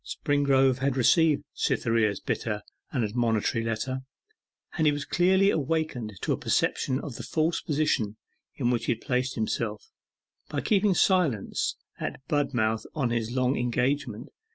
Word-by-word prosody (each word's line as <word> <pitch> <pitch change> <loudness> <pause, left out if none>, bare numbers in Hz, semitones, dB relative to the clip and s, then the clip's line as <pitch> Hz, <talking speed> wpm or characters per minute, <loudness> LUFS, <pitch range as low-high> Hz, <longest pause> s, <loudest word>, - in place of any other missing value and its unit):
Springrove 135 -3 +2
had 135 0 0
received 150 +4 +4
Cytherea's 115 -4 +1
bitter - - -3 0.3
and 125 - 0
admonitory 115 0 0
letter, 115 +4 -2 0.8
and 160 -3 +2
he - - +6
was 145 -1 -3
clearly 190 +4 +3
awakened 150 -7 -1
to - - -1
a - - -2
perception 130 0 +1
of 140 -6 -7
the - - -6
false 160 +1 0
position 140 -9 0 0.4
in 120 - 0
which 120 - 0
he - - +2
had 115 - -11
placed 130 -1 -1
himself, 110 -1 -3 0.6
by - - -2
keeping 200 -2 +2
silence 165 - +1 0.2
at - - -4
Budmouth 120 -7 0
on 135 -6 0
his 115 -2 -1
long 130 +2 +1
engagement. 125 -1 -1
130 Hz, 145 wpm, -27 LUFS, 115-150 Hz, 0.8 s, he